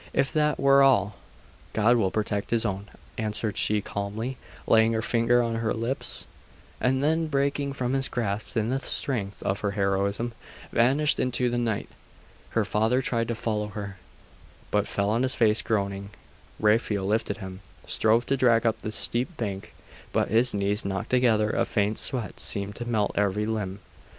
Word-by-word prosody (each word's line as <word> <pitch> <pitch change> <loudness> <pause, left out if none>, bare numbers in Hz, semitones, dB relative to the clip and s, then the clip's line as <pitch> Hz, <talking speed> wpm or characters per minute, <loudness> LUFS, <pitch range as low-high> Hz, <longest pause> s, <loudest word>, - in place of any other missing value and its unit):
'If 135 0 +1
that 150 -2 +1
were 140 0 +5
all 105 -7 +4 0.3
' - - -26
'God 110 +3 +4
will 105 -5 +2
protect 105 -1 -2
His 115 -1 +1
own,' 100 -1 -3 0.3
answered 105 -1 -2
she 105 -1 +2
calmly, 105 +6 -4 0.3
laying 110 0 +4
her 110 - 0
finger 120 +2 +3
on 115 -1 -1
her 115 0 -1
lips; 115 +4 -3 0.5
and 130 +2 +1
then 160 +2 +2
breaking 140 -1 0
from 125 -1 -2
his 135 0 +1
grasp 110 -1 -3
in 110 0 +1
the 135 - 0
strength 110 -8 -3
of 100 +1 -1
her 100 -1 -1
heroism, 100 +4 0 0.4
vanished 135 +6 +3
into 125 -1 +1
the 120 - 0
night. 115 -4 -1 0.7
Her 110 - +3
father 110 +6 +1
tried 115 -2 0
to 115 - -2
follow 105 -2 -2
her, 100 -2 -7 0.7
but 105 0 +1
fell 100 +1 0
on 115 +2 +1
his 130 0 +1
face, 110 -1 +3
groaning. 100 -2 -2 0.5
Raphael 105 -2 +2
lifted 105 -1 0
him, 95 -1 -8 0.3
strove 115 +2 +2
to 135 - +1
drag 120 -3 +4
up 115 -1 +1
the 110 - -4
steep 125 +9 -1
bank: 100 -4 -5 0.4
but - - +1
his 115 +4 +3
knees 100 +1 0
knocked 100 +3 -3
together; 115 -4 +3
a 120 - +1
faint 105 -2 0
sweat 125 -6 -2
seemed 100 0 0
to 120 - -5
melt 105 -3 +1
every 105 +1 +1
limb.... 105 -3 -3
110 Hz, 175 wpm, -26 LUFS, 100-125 Hz, 0.7 s, were